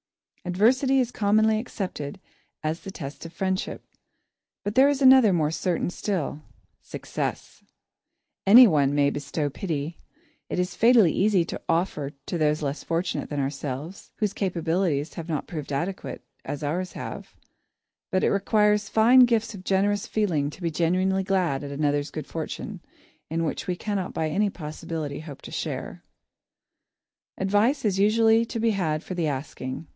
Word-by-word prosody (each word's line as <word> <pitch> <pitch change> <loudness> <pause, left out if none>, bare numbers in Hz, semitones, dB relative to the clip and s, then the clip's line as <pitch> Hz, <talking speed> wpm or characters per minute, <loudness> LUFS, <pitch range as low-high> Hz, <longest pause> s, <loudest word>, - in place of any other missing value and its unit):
Adversity 250 +9 +3
is 245 -2 0
commonly 215 0 +3
accepted 185 -10 -5 0.4
as 155 +2 -1
the 195 - -9
test 145 -7 -7
of - - -13
friendship, 190 +1 -2 0.8
but 205 0 -2
there 265 +4 +6
is 285 -2 0
another 260 -5 +7
more 155 -4 +1
certain 175 +1 -1
still 175 -7 -3 0.4
success. - - -5 0.8
Anyone 165 - +7
may 140 -1 +3
bestow 145 +1 -3
pity. 160 -1 -4 0.5
It - - -3
is 180 0 -1
fatally 230 -7 +5
easy 195 -4 +3
to - - -6
offer 165 -4 0
to 175 - -3
those 150 0 +1
less 140 +1 -3
fortunate 165 +2 -2
than 145 - -3
ourselves; 140 +5 -5
whose 210 -2 -1
capabilities 170 -4 -1
have 170 -1 -7
not 150 -4 -2
proved 155 -4 -6
adequate, 145 -2 -4 0.2
as 145 +1 -5
ours 175 +6 -2
have; - - -7 0.7
but 185 -1 0
it - - +3
requires 210 0 +2
fine 235 +5 +6
gifts 225 -2 0
of 190 -2 -9
generous 200 +1 +1
feeling 170 -10 0
to 175 - -11
be 165 - 0
genuinely 185 +4 +1
glad 180 -8 0
at 140 - -6
another's 145 0 0
good 155 -3 -6
fortune, 165 +5 -6 0.5
in 165 +1 -1
which 160 - -3
we 180 - 0
cannot 195 -1 -3
by 160 - 0
any 205 +6 +1
possibility 155 -3 -5
hope 150 -3 -10
to - - -9
share. - - -5 1.3
[Sidenote: 195 - -2
Advice] 205 +3 +4
Advice - - -9
is 195 -2 +1
usually 225 +2 +4
to 230 - -5
be 225 0 +2
had 160 -6 -1
for - - -6
the 170 -3 -1
asking. 135 +1 -5
180 Hz, 160 wpm, -25 LUFS, 150-205 Hz, 1.3 s, another